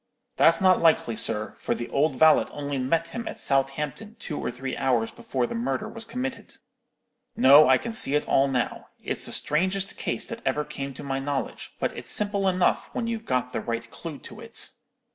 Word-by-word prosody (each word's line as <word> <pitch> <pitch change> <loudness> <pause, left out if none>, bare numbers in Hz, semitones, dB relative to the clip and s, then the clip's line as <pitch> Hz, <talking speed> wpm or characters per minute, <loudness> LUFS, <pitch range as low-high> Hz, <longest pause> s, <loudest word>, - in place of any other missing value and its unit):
"'That's - - +5
not 185 -2 +4
likely, 160 -8 +3
sir; 110 -1 +2
for - - -1
the 120 - -5
old 140 0 +1
valet 155 +3 +5
only 145 -1 -4
met 165 +6 0
him 235 +6 -6
at - - -6
Southampton 150 +11 -1
two 150 - -6
or - - -3
three 130 +2 -5
hours 120 -4 0
before 130 -2 -2
the - - -5
murder 130 +3 -2
was 230 -1 -5
committed. 260 +2 -6 0.8
No; 140 +1 +8
I 130 - +6
can 230 - -6
see 145 -10 +4
it 150 - 0
all 135 +1 +3
now. 125 -3 -2 0.2
It's - - +2
the - - -2
strangest 190 +5 0
case - - -2
that 230 0 -7
ever 150 0 0
came 135 -1 -6
to - - -9
my 135 -1 -2
knowledge, 135 -2 -4
but - - -2
it's - - -6
simple 200 -2 +1
enough 185 -1 +1
when 235 - -2
you've 230 -1 -4
got 125 -1 -1
the - - -2
right 115 0 -4
clue 165 -4 -7
to 210 +8 -12
it. 230 0 -5
145 Hz, 200 wpm, -26 LUFS, 130-195 Hz, 0.8 s, No